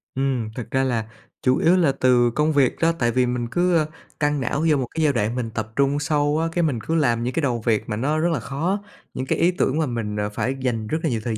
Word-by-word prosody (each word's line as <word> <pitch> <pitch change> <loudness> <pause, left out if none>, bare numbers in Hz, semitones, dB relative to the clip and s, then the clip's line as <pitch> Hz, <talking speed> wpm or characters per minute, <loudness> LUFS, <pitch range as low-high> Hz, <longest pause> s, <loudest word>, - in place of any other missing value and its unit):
Ừm, 130 -4 -1
thực 115 -2 -7
ra 130 0 +2
là 115 -4 0 0.4
chủ 130 0 +3
yếu 175 +3 +4
là 165 -6 +3
từ 125 -2 +3
công 150 +4 +1
việc 135 -3 +3
đó, 165 0 +4
tại 120 -1 +2
vì 125 +1 +2
mình 120 -1 -2
cứ 175 -2 +2 0.3
căng 145 -2 +1
não 145 +5 -1
vô 150 - +4
một 130 -3 -2
cái 160 - +1
giai 145 - +3
đoạn 115 0 0
mình 120 -3 -2
tập 110 -1 -5
trung 140 +1 +2
sâu 145 0 +1
á, 165 - 0
cái 175 +1 0
mình 140 -8 0
cứ 165 - -2
làm 120 -7 +2
những 125 - -2
cái 165 - 0
đầu 120 -5 0
việc 110 -3 +1
mà 105 - -1
nó 140 +8 0
rất 170 +2 +1
là 145 - -1
khó, 165 - -2 0.3
những 130 - -3
cái - - -1
ý 175 - +4
tưởng 155 -5 0
mà 155 - +2
mình, 110 -4 -3
à, 105 0 -1
phải 120 +5 -2
dành 115 -4 -1
rất 155 - -1
là 160 - +1
nhiều 115 -4 -1
thời 115 -2 -2
130 Hz, 280 wpm, -23 LUFS, 120-155 Hz, 0.4 s, yếu